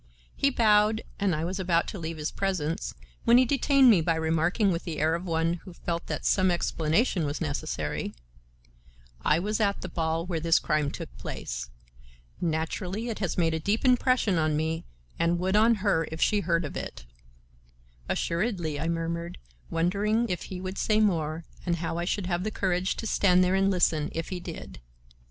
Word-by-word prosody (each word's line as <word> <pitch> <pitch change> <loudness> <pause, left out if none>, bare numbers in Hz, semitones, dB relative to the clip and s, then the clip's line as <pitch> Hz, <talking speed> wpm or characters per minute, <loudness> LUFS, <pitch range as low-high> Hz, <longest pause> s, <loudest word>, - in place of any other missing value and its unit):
He 275 - +3
bowed 215 -3 +3 0.2
and 195 -4 +1
I 155 +2 -2
was 185 +3 -3
about 175 -2 +1
to 200 - -6
leave 165 0 -5
his 150 0 -3
presence, 175 -5 -2 0.3
when 235 +1 +6
he 255 - +6
detained 275 0 +5
me 185 -6 +5
by 165 +1 +1
remarking 165 +6 +1
with 170 0 -2
the 165 -4 -5
air 155 +1 +2
of 170 +2 -3
one 165 0 0
who 185 - -10
felt 170 0 -4
that - - -4
some 185 -2 +3
explanation 170 +3 +1
was 145 0 -2
necessary: 150 -3 -3 1.1
"I 150 - +4
was 210 +6 -1
at 200 -2 +1
the - - -4
ball 165 -1 -1
where 175 -3 -2
this 165 +1 +4
crime 150 -2 0
took - - -8
place. - - -5 0.7
Naturally 180 +6 -2
it 225 - -4
has 190 -5 -2
made 165 -2 +2
a 160 - -1
deep 205 - 0
impression 250 -7 +3
on 155 -1 +1
me 160 +1 -2 0.3
and 170 +1 +2
would 185 +3 0
on 225 +2 +5
her 165 -5 +2
if 160 - -6
she 210 - +3
heard 170 -3 0
of 145 - -7
it." - - -6 1.0
"Assuredly," 170 -5 -1
I 165 - -2
murmured, 170 0 -3 0.3
wondering 205 +7 +1
if 180 -2 -3
he 185 - -6
would 185 +1 -5
say 215 0 +2
more 165 -6 +1 0.2
and 175 - 0
how 170 0 -3
I 175 - -1
should 200 +1 -1
have 175 0 -1
the 215 - -1
courage 185 -3 0
to - - -6
stand 185 -4 +4
there 180 +1 +2
and 195 0 +3
listen 165 -5 +2
if 165 0 -4
he 185 - -4
did. 170 - -8
175 Hz, 190 wpm, -27 LUFS, 165-200 Hz, 1.1 s, when